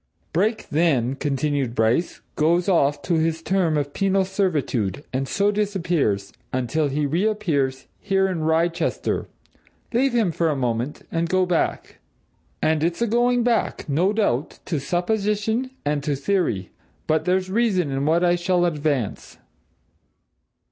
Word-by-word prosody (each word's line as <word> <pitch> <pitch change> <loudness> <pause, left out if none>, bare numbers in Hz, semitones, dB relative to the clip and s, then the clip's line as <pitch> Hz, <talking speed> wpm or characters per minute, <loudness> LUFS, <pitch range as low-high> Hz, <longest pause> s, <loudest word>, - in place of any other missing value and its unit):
"Brake, 215 +7 0
then," 145 -6 +2
continued 140 -2 -1
Bryce, 115 +9 +1
"goes 170 +4 +2
off 145 -6 +2
to 170 -3 +1
his 160 0 -1
term 180 -5 +1
of 145 -1 -2
penal 195 -1 +1
servitude, 150 - -1
and 135 +1 -1
so 200 +5 +1
disappears 170 - 0 0.2
until 130 +5 0
he 145 +2 -1
reappears 155 -6 0
here 195 -1 +1
in 185 -3 -2
Wrychester. 165 +2 0 0.7
Leave 260 +2 +2
him 220 -7 +2
for 165 0 0
a 150 - 0
moment, 125 +2 -2
and 165 0 -1
go 185 0 +3
back. 180 -2 -1 0.6
And 155 -1 +2
it's 170 +7 0
a - - +3
going 240 +2 +2
back, 235 -1 0
no 165 +7 +2
doubt, 170 - 0
to 160 -5 -1
supposition 210 - 0 0.2
and 145 -1 0
to 145 -2 0
theory 140 - -1 0.3
but 155 0 +1
there's 185 +1 +1
reason 195 -8 +1
in 135 +2 -1
what 165 +3 +3
I 175 0 +4
shall 175 0 +1
advance. 145 - -2
165 Hz, 140 wpm, -23 LUFS, 145-195 Hz, 0.7 s, I